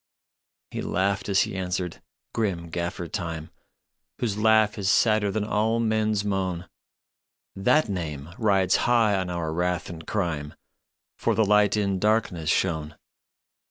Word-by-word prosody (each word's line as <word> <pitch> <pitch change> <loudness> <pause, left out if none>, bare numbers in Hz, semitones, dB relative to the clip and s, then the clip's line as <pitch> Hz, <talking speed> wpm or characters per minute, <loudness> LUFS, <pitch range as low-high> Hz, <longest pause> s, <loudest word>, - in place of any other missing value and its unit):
" - - -67
He - - -4
laughed 100 +2 -1
as 100 0 +4
he - - -2
answered, 90 -1 -3 0.3
grim 90 -7 -1
Gaffer 85 0 -3
Time, 80 -1 -5 0.7
Whose 110 -5 -1
laugh 110 0 +3
is 95 -1 0
sadder 105 -2 +3
than 105 +1 -1
all 110 +2 +1
men 110 -1 +1
s 100 -1 0
moan. 95 -3 -2 0.5
" - - -76
That 155 -3 +4
name 80 -7 -4
rides 95 -5 +3
high 115 -4 +4
on 95 -2 -1
our 85 -3 -2
wrath 90 0 -1
and 80 -2 -10
crime, 80 -8 -2 0.6
For - - +1
the 110 - +3
Light 105 +1 +4
in 100 -2 0
darkness 100 -6 +1
shone. 80 -4 0
95 Hz, 150 wpm, -25 LUFS, 85-105 Hz, 0.7 s, as